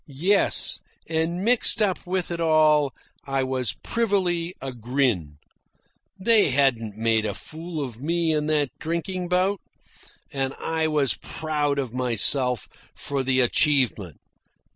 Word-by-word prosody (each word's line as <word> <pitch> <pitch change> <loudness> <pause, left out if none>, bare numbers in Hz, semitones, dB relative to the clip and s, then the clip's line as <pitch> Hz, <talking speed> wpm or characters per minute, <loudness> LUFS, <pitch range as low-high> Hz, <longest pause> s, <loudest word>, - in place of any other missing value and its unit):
Yes, 175 +9 +2 0.3
and 165 +3 -1
mixed 235 +1 +4
up 195 -4 0
with 180 -1 -2
it 170 - -3
all 155 -3 +3 0.4
I 135 -1 0
was 130 -2 -1
privily 185 -6 -1
a 135 0 -5
grin. 120 - -1 0.8
They 215 -2 +4
hadn't 120 -6 +1
made 110 -1 +1
a 105 -1 -3
fool 160 - -6
of 125 -3 -7
me 165 +1 0
in 150 -1 -1
that 150 -4 +1
drinking 170 +3 -3
bout. 185 +2 +1 0.7
And 135 -1 -2
I 160 -1 -1
was 150 -4 +2
proud 150 -3 -2
of 130 -4 -3
myself 125 -1 +1 0.3
for 140 -1 -3
the 130 0 +2
achievement. 125 - +1
150 Hz, 130 wpm, -24 LUFS, 130-170 Hz, 0.8 s, mixed